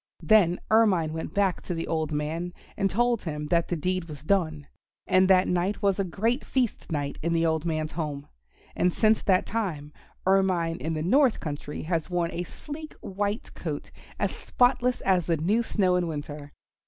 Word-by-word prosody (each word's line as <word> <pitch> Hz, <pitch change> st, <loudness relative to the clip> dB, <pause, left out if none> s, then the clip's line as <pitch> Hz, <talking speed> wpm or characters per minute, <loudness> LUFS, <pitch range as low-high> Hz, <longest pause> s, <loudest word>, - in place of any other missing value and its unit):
Then 190 Hz, -5 st, +4 dB
Ermine 190 Hz, -8 st, +4 dB
went 160 Hz, -1 st, -5 dB
back 195 Hz, -3 st, +1 dB
to 175 Hz, -, -4 dB
the 165 Hz, -, -3 dB
old 160 Hz, -2 st, -1 dB
man 160 Hz, +4 st, -3 dB, 0.2 s
and 195 Hz, -, +1 dB
told 240 Hz, +3 st, +1 dB
him 150 Hz, -3 st, -4 dB
that 170 Hz, -1 st, +2 dB
the 175 Hz, -, -1 dB
deed 180 Hz, +2 st, -1 dB
was 150 Hz, -3 st, -10 dB
done; 155 Hz, -5 st, 0 dB, 0.4 s
and 185 Hz, 0 st, +4 dB
that 185 Hz, -1 st, +5 dB
night 180 Hz, +4 st, 0 dB
was 200 Hz, -1 st, +2 dB
a -, -, +3 dB
great 225 Hz, -, -1 dB
feast 250 Hz, -8 st, -1 dB
night 145 Hz, -2 st, -2 dB
in 170 Hz, +1 st, 0 dB
the 165 Hz, 0 st, +2 dB
old 160 Hz, 0 st, 0 dB
man's 155 Hz, -2 st, -1 dB
home. 150 Hz, -3 st, -4 dB, 0.5 s
And 180 Hz, -, +2 dB
since 215 Hz, +3 st, +3 dB
that 185 Hz, -2 st, +3 dB
time 165 Hz, -10 st, -3 dB, 0.3 s
Ermine 185 Hz, -3 st, +2 dB
in 160 Hz, +5 st, -3 dB
the 155 Hz, -, -2 dB
North 255 Hz, -, +4 dB
Country 145 Hz, -1 st, -5 dB
has 160 Hz, 0 st, -1 dB
worn 175 Hz, -2 st, 0 dB
a 175 Hz, -, -3 dB
sleek 300 Hz, -, -8 dB
white 205 Hz, +3 st, -3 dB
coat -, -, -5 dB, 0.3 s
as -, -, 0 dB
spotless 250 Hz, 0 st, +1 dB
as 185 Hz, -4 st, +2 dB
the 165 Hz, -2 st, +2 dB
new 200 Hz, +10 st, +2 dB
snow 190 Hz, -5 st, +1 dB
in 175 Hz, -1 st, 0 dB
winter. 145 Hz, -2 st, -6 dB
175 Hz, 185 wpm, -27 LUFS, 160-200 Hz, 0.5 s, that